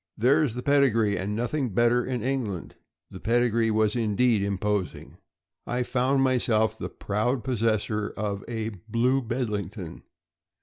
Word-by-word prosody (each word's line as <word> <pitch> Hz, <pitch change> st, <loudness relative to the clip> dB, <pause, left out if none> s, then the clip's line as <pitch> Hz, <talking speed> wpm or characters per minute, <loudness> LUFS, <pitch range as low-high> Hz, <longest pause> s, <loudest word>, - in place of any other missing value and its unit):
" -, -, -58 dB
There's 135 Hz, +1 st, +3 dB
the 125 Hz, -, -5 dB
pedigree, 120 Hz, -8 st, +3 dB
and 100 Hz, +3 st, -3 dB
nothing 120 Hz, 0 st, -2 dB
better 120 Hz, +1 st, +3 dB
in 125 Hz, -4 st, -3 dB
England." 120 Hz, -9 st, -3 dB, 0.4 s
The -, -, -9 dB
pedigree 115 Hz, 0 st, +2 dB
was 110 Hz, 0 st, +2 dB
indeed 115 Hz, 0 st, +2 dB
imposing. 100 Hz, 0 st, -2 dB, 0.5 s
I 125 Hz, +1 st, 0 dB
found 130 Hz, +2 st, +1 dB
myself 115 Hz, -4 st, +2 dB
the 110 Hz, -, -5 dB
proud 115 Hz, +5 st, -1 dB
possessor 110 Hz, -3 st, 0 dB
of 100 Hz, -2 st, -3 dB
a 110 Hz, -2 st, -3 dB, 0.2 s
"Blue 125 Hz, +4 st, +2 dB
Bedlington. 105 Hz, -7 st, -4 dB
115 Hz, 135 wpm, -26 LUFS, 105-125 Hz, 0.5 s, There's